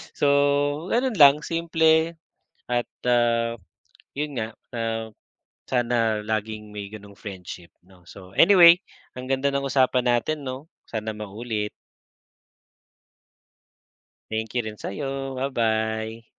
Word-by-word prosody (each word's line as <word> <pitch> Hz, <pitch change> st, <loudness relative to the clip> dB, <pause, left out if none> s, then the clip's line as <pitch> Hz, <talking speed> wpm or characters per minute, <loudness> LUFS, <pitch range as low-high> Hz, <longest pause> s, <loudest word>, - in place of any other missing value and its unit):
So, -, -, 0 dB, 0.6 s
ganun 240 Hz, -3 st, 0 dB
lang, 145 Hz, +1 st, +7 dB
simple 160 Hz, 0 st, +2 dB, 0.6 s
at 120 Hz, -1 st, +1 dB, 0.2 s
ah, 120 Hz, -1 st, +2 dB, 0.6 s
yun 150 Hz, +1 st, -2 dB
nga, 110 Hz, +1 st, -5 dB, 0.2 s
ah, 115 Hz, -1 st, -3 dB, 0.6 s
sana 115 Hz, -4 st, +1 dB
laging 110 Hz, 0 st, -3 dB
may 105 Hz, -1 st, -6 dB
ganong 100 Hz, -1 st, -12 dB
friendship, 90 Hz, -3 st, -9 dB
‘no? 90 Hz, -1 st, -22 dB
So, 95 Hz, -1 st, -13 dB
anyway, 175 Hz, -3 st, +8 dB, 0.4 s
ang 130 Hz, -, -7 dB
ganda 135 Hz, +1 st, +1 dB
ng 140 Hz, 0 st, -1 dB
usapan 130 Hz, -2 st, +2 dB
natin, 135 Hz, +4 st, 0 dB
‘no? 130 Hz, +5 st, -7 dB, 0.2 s
Sana 110 Hz, -1 st, -4 dB
maulit. 105 Hz, 0 st, -4 dB, 2.6 s
Thank 110 Hz, +2 st, -3 dB
you -, -, +3 dB
rin 105 Hz, -1 st, -6 dB
sa’yo. 135 Hz, +3 st, -4 dB
Ba-bye. 110 Hz, -3 st, -1 dB
115 Hz, 110 wpm, -24 LUFS, 110-140 Hz, 2.6 s, anyway